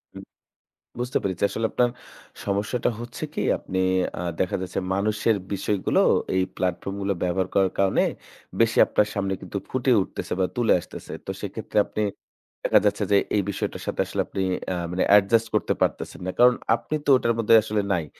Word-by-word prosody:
হু, - - -7 0.8
বুঝতে 125 +1 0
পেরেছি, 95 -1 -3
আসলে 115 - -1
আপনার 120 -1 +2 0.5
সমস্যাটা 100 +5 0
হচ্ছে 120 0 -6
কি? - - -2 0.2
আপনি 95 - -4 0.4
আ - - -4 0.2
দেখা 90 - +1
যাচ্ছে 95 - -4 0.2
মানুষের 105 +2 +1 0.2
বিষয়গুলো 100 0 0 0.4
এই 95 - +3
platform 95 +2 -2
গুলো 100 0 +1
ব্যবহার 90 +1 0
করার 95 -1 +3
কারণে 95 -1 +3 0.6
বেশি 115 -1 +3
আপনার 105 0 +2
সামনে 100 -1 -1
কিন্তু 100 - -5
ফুটে 130 0 0
উঠতেছে - - -6
বা 95 - +3
তুলে 120 -2 +3
আসতেছে। - - -10
তো - - -4
সেক্ষেত্রে 105 +1 -3
আপনি 105 - -3 0.6
দেখা - - +5
যাচ্ছে - - +1
যে 100 - +6 0.2
এই 105 - +3
বিষয়টার 100 - -4
সাথে - - -1
আসলে - - -2
আপনি 95 - -4 0.3
অ্যা 95 - -1 0.2
মানে 90 - 0
adjust 115 +3 +3
করতে - - +1
পারতেছেন - - -1
না, 95 - -1
কারণ 125 0 +7 0.2
আপনি 155 - -4
তো - - 0
ওটার 115 -1 +1
মধ্যে 115 0 +5
আসলে 105 -1 0
নাই। 85 -3 -1
100 Hz, 175 wpm, -24 LUFS, 95-115 Hz, 0.8 s, কারণ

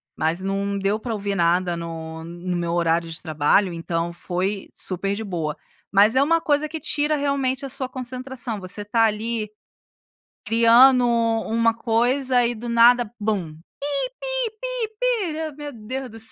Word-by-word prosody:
Mas 160 +3 0
não 200 +1 -2
deu 200 +2 0
pra 230 0 -4
ouvir 200 -1 -2
nada 175 0 +2
no 160 -1 -6
no 175 +2 -5
meu 170 -1 -1
horário 170 -1 +1
de 165 - -5
trabalho, 160 +4 +2
então 165 0 -3
foi 185 +3 -3
super 195 +2 -3
de 220 - -4
boa. 165 -6 -3 0.3
Mas 205 +4 +5
é 265 - +5
uma 330 +4 +3
coisa 300 -1 +1
que 320 +1 -5
tira 300 -2 0
realmente 275 -2 0
a - - -5
sua 260 0 -2
concentração, 255 -3 -4
você 195 +3 -3
tá 225 +2 +3
ali 220 0 -2 1.0
criando 240 +2 +6
uma 230 0 +2
coisa 245 +2 +2
e 240 - 0
do 240 +1 -7
nada 235 0 +5
bum. 205 -7 -2 0.7
Pi-pi-pi-pi. 455 -8 -2
Meu 295 -1 -6
Deus 255 +4 -5
do 225 - -11
céu. 220 - -5
225 Hz, 155 wpm, -23 LUFS, 185-265 Hz, 1.0 s, criando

